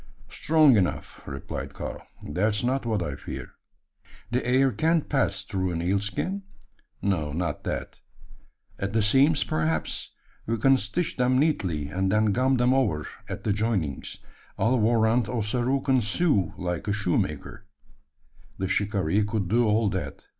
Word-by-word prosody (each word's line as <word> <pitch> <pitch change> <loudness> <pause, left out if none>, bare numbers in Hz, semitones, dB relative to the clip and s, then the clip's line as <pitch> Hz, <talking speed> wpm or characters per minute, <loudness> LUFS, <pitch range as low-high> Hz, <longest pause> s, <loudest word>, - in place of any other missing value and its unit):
"Strong 155 -6 +4
enough," 90 -3 -1
replied 70 -1 -6
Karl. - - -6 0.3
"That's 105 +8 0
not 130 0 0
what 105 -5 0
I 75 -4 -3
fear." - - -7 0.8
"The 125 +2 0
air 130 +2 +3
can't 160 +3 +1
pass 100 -8 0
through 95 -1 -2
an 85 - -2
eel 95 +3 +2
skin?" 105 - -3 0.6
"No 80 -7 0
not 85 +2 -2
that." - - -4 0.8
"At 100 +1 -3
the 110 -1 +2
seams, 135 +7 +4
perhaps? 80 0 -1 0.4
We 115 +1 0
can 135 +4 +5
stitch 140 - -2
them 125 0 +3
neatly; 90 - 0
and 95 +3 0
then 105 0 +3
gum 130 +3 +2
them 125 +1 +3
over 105 - +1 0.2
at - - -5
the 105 - +1
joinings. 100 - -2 0.4
I'll 125 +2 +2
warrant 115 0 +3
Ossaroo 125 +4 0
can 130 -2 +2
sew 110 - +1
like 90 0 -3
a 100 - +1
shoemaker." 100 -5 -2 0.9
The 95 - -2
shikaree 100 -1 +1
could 105 -2 -1
do 115 +2 +3
all 105 +1 +3
that. 95 -2 -4
110 Hz, 150 wpm, -26 LUFS, 95-130 Hz, 0.9 s, can